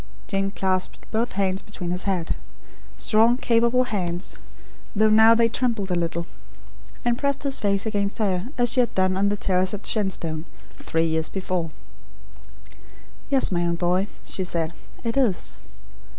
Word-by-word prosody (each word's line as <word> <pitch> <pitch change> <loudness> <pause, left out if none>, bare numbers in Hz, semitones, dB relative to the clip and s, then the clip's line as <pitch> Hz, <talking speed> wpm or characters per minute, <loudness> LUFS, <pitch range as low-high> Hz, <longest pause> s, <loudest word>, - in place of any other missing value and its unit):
Jane 195 0 -1
clasped 190 -1 -1
both 230 +2 0
hands 190 -1 0
behind 180 -4 -6
his 180 +1 -2
head 185 -4 0 0.6
strong, 225 +3 +3
capable 235 +1 +3
hands, 180 -7 -1 0.6
though 215 +1 +4
now 220 +1 +7
they 230 0 +4
trembled 230 -5 -1
a - - +2
little 170 0 -1 0.8
and 240 0 +1
pressed 280 0 0
his 275 -2 0
face 200 0 +1
against 205 -2 -1
her, 195 -2 0
as 240 -1 +2
she - - +1
had 245 - +1
done 185 0 +2
on 200 +1 +2
the 205 - -1
terrace 185 0 +1
at 205 - -10
Shenstone, 175 -7 0 0.3
three 165 0 0
years 160 -1 +1
before. 185 -3 -2 1.6
"Yes, 270 -6 +4
my 175 -1 +1
own 170 0 +1
boy," 180 +3 +1 0.2
she 190 - -3
said; 170 -2 -1 0.3
"it 230 +2 -2
is." 235 -9 +1
195 Hz, 155 wpm, -24 LUFS, 180-230 Hz, 1.6 s, now